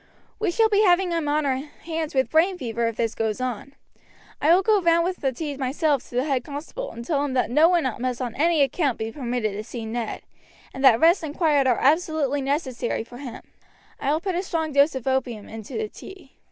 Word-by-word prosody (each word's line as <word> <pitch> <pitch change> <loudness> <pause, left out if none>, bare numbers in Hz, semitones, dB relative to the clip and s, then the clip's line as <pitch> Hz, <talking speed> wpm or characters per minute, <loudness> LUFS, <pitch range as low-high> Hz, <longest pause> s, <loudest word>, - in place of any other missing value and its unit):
We 425 -3 +1
shall 445 +6 +3
be 420 -1 +3
having 365 -2 +3
him 330 -3 -1
on 295 +1 +1
our 265 -2 +1
hands 310 +2 -6
with 265 0 +1
brain 355 +4 +3
fever 235 -5 -2
if 230 - -3
this 230 -1 -1
goes 220 0 -2
on. 255 +2 -4 0.7
I 305 - +4
will 365 +3 +5
go 430 -2 +3
round 335 -1 +3
with 365 +1 -2
the 270 - -1
tea 290 +2 -5
myself 280 +1 0
to - - -10
the 250 - +2
head 270 -4 0
constable 305 - -6
and 235 - -9
tell 285 0 0
him 285 -2 -2
that 250 -3 0
no 305 +6 +5
one 350 -2 +2 0.2
must 250 -1 -2
on 245 -3 -3
any 320 0 +3
account 275 -1 0
be 220 0 -4
permitted 240 -4 -2
to 210 +2 -5
see 230 0 -7
Ned, 225 0 -4 0.5
and 265 - -6
that 235 -4 +7
rest 340 +4 +5
and 300 -1 -6
quiet 295 -6 +3
are 245 - +3
absolutely 295 -2 +1
necessary 265 -4 -2
for 245 +2 -12
him. 260 -5 -8 0.6
I 280 - 0
will 310 - +1
put 380 0 -2
a 350 - 0
strong 325 -4 -2
dose 280 +1 +4
of 260 - -5
opium 255 -5 -1
into 220 - -7
the 440 -1 -2
tea." 380 -9 -13
280 Hz, 230 wpm, -24 LUFS, 250-330 Hz, 0.7 s, that